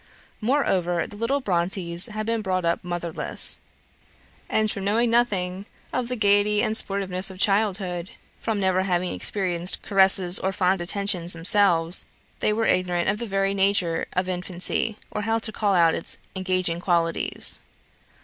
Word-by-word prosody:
Moreover, 190 -9 0
the - - -11
little 240 +6 -1
Brontes 175 -2 +1
had 215 -1 -5
been 230 0 -1
brought 185 -3 -2
up 170 0 0
motherless; 175 -2 +1 0.9
and 215 -1 +1
from 200 - -4
knowing 225 +4 +1
nothing 195 -5 0 0.3
of 250 -2 -1
the 250 - -2
gaiety 205 -1 +3
and 215 - -1
the - - +9
sportiveness 195 -1 -1
of 190 - -11
childhood 195 -3 0 0.3
from 220 -2 -2
never 185 -1 +1
having 180 -1 -1
experienced 180 -3 -1
caresses 190 -2 +4
or 190 - -1
fond 185 -1 0
attentions 185 -1 0
themselves 170 -1 +3 0.3
they - - +1
were 220 +1 0
ignorant 180 -2 +1
of 205 +2 -1
the 235 - -4
very 195 0 0
nature 190 -4 +1
of 180 0 -1
infancy, 185 +4 -2
or 210 - -3
how 225 +2 0
to 225 -1 -2
call 205 -2 0
out 165 -2 +4
its - - -3 0.2
engaging 185 -2 -1
qualities. 170 -2 -1
190 Hz, 155 wpm, -24 LUFS, 180-210 Hz, 0.9 s, the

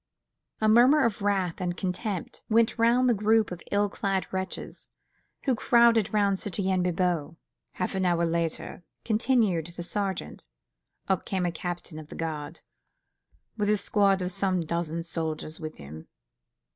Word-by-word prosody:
A 215 - +2
murmur 250 +7 +6
of 215 -3 -1
wrath 195 -3 0
and 175 -1 -2
contempt 185 0 -4
went 230 +1 +3
round 240 +2 +4
the 245 - +5
group 215 0 +2
of 180 - -6
ill 205 0 +3
clad 195 -1 -1
wretches, 190 0 -5 0.5
who 265 - +2
crowded 235 -2 +4
round 200 -2 +2
Citoyen 190 -1 -1
Bibot. 175 -3 0 0.4
"Half 185 - -2
an 190 -1 -1
hour 170 -1 +2
later," 170 +1 -2 0.2
continued 215 -7 +2
the 175 0 -7
sergeant, 190 - -4 0.6
"up 190 -2 +1
comes 190 -2 -1
a 175 - 0
captain 175 -2 -5
of 155 - -10
the - - -10
guard 155 -1 -5 1.0
with 210 -1 0
a 210 - +4
squad 195 -2 +2
of 180 - -2
some 185 -1 0
dozen 170 0 -2
soldiers 160 -2 -4
with 155 -1 -7
him. 75 +2 -10
190 Hz, 150 wpm, -27 LUFS, 170-210 Hz, 1.0 s, murmur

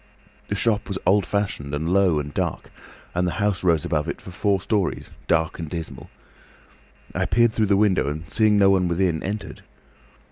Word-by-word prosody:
The 100 - -2
shop 105 0 0
was 100 - -3
old 95 +1 +3
fashioned 95 -9 -2
and 80 +2 -3
low 90 -2 +3
and 75 0 -4
dark, - - -3 0.4
and 90 0 0
the 90 - -2
house 105 -3 0
rose 85 -4 +2
above 75 -1 -1
it - - -4
for 95 - -11
four 100 +1 +1
storeys, 100 -1 -2 0.2
dark 80 +1 +1
and 80 -2 -5
dismal. 85 -1 -7 1.0
I - - 0
peered 120 -1 +3
through 110 -1 +1
the 100 0 +3
window 100 -7 +2
and, 75 +2 -5
seeing 110 +1 +3
no 100 -1 +5
one 95 -2 +2
within, 85 -2 0
entered. 100 +2 -5
95 Hz, 185 wpm, -23 LUFS, 80-100 Hz, 1.0 s, no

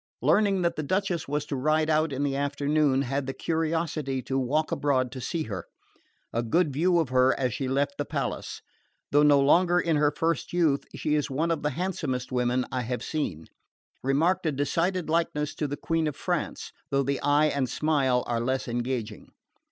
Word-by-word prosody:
Learning 200 -3 +3
that 170 - +1
the - - 0
Duchess 185 +1 -1
was 145 +1 -2
to 145 - -4
ride 155 +4 +1
out 155 0 +2
in 135 +1 -2
the 140 -1 0
afternoon, 140 0 +1
had 135 +1 -2
the 135 - -2
curiosity 160 -4 -1
to 135 0 -1
walk 150 +5 0
abroad 130 -4 +1
to 130 - -7
see 160 +6 -2
her. 100 - -6 0.7
A 115 - +1
good 145 +6 +1
view 175 +5 +2
of 160 -6 +1
her 130 0 +3
as 125 -3 0
she 135 - -3
left 140 +2 -1
the - - +1
palace. - - -4 0.5
Though 145 - +5
no 145 -1 +6
longer 175 +5 +4
in 165 -3 +1
her 145 0 +4
first 165 +3 -2
youth 160 -6 +2
she 150 - -1
is 150 -1 +1
one 155 +5 0
of 165 - -1
the 150 - 0
handsomest 145 -6 -3
women 125 0 +1
I 130 - -1
have 125 +1 -3
seen. 90 - -3 0.6
Remarked 165 +7 +1
a - - +2
decided 165 +6 0
likeness 155 -2 0
to 150 - -2
the 145 +1 -4
Queen 165 -1 0
of 150 - -3
France, - - -3 0.2
though 140 0 +1
the 140 +1 -1
eye 145 +1 +3
and 135 -3 0
smile 135 -5 +1
are 120 -1 -1
less 130 +3 -1
engaging. 120 -1 -3
145 Hz, 195 wpm, -27 LUFS, 130-160 Hz, 0.7 s, no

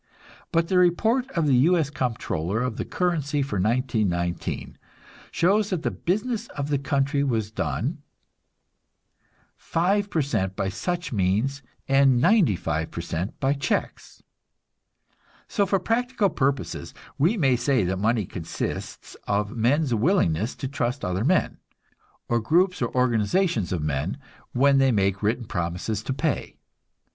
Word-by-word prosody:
But 165 0 +2
the 185 0 +3
report 225 +9 +2
of 165 -3 +1
the 140 - +3
U. 170 +8 +4
S. 150 -3 0
Comptroller 110 - -2
of 125 -3 -3
the - - -3
Currency 150 -5 0
for 120 -7 -3
1919 105 -6 -1 0.5
shows 200 +4 +2
that 180 -4 -2
the - - 0
business 220 +5 -2
of 140 0 -2
the 145 -2 +1
country 140 0 0
was 110 -6 -1
done, 140 +7 -2 1.6
5% 165 - 0
by 95 - -1
such 175 - -3
means 110 +8 0 0.3
and 135 -2 +4
95 105 - +2 0.2
% 90 +6 -3
by 135 +1 +2
checks; 140 0 -3 1.2
so, 200 -2 +1
for 195 - +2
practical 230 +1 0
purposes, 135 -1 -2 0.2
we 175 +11 +3
may 135 -8 +3
say 120 -1 +1
that 95 +1 -1
money 110 0 +1
consists 85 -1 -5
of 105 +1 -1
men's 130 +4 +2
willingness 110 - +1
to 135 - -4
trust 125 -2 -2
other 90 +3 -1
men, 175 +6 +1 0.7
or 120 - +1
groups 180 - +2
or 120 - 0
organizations 125 - +1
of 85 -4 -1
men, 75 - -2 0.3
when 135 +2 +4
they 135 -1 +4
make 100 -3 +1
written 115 +3 0
promise 90 +3 -3
to 120 - -4
pay. 130 -1 -2
135 Hz, 135 wpm, -25 LUFS, 105-170 Hz, 1.6 s, U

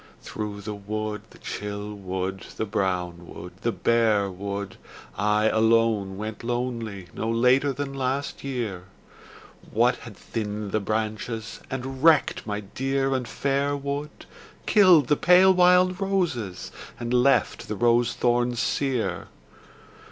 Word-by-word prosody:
Through 105 -1 -5
the 105 +1 -5
wood, 105 +1 -4
the - - -17
chill 105 0 -5
wood, 95 -1 -4
the 110 - -1
brown 90 -4 -2
wood, 90 0 -9
the 115 - +1
bare 110 -4 +2
wood, 100 +1 -5 0.4
I 105 +1 +2
alone 110 -3 +2
went 110 +2 -6
lonely 115 -6 -3
no 110 - -3
later 125 +5 +3
than 135 +1 -4
last 135 +1 -2
year, 115 -10 -4 0.8
What - - +2
had - - -11
thinned 105 -2 -4
the 110 - +1
branches, 110 +1 -3
and 135 +1 -5
wrecked 160 -7 +4
my 105 0 -2
dear 135 +6 -1
and 130 -2 -2
fair 140 +1 0
wood, 140 +1 -5 0.4
Killed 185 - +6
the 150 - +4
pale 180 +4 +6
wild 180 +1 +4
roses 170 - -1 0.3
and 120 0 -3
left 125 +3 +2
the 105 - -3
rose 120 +2 +3
thorns 120 0 +1
sere? 130 -4 -1
115 Hz, 130 wpm, -25 LUFS, 105-135 Hz, 0.8 s, Killed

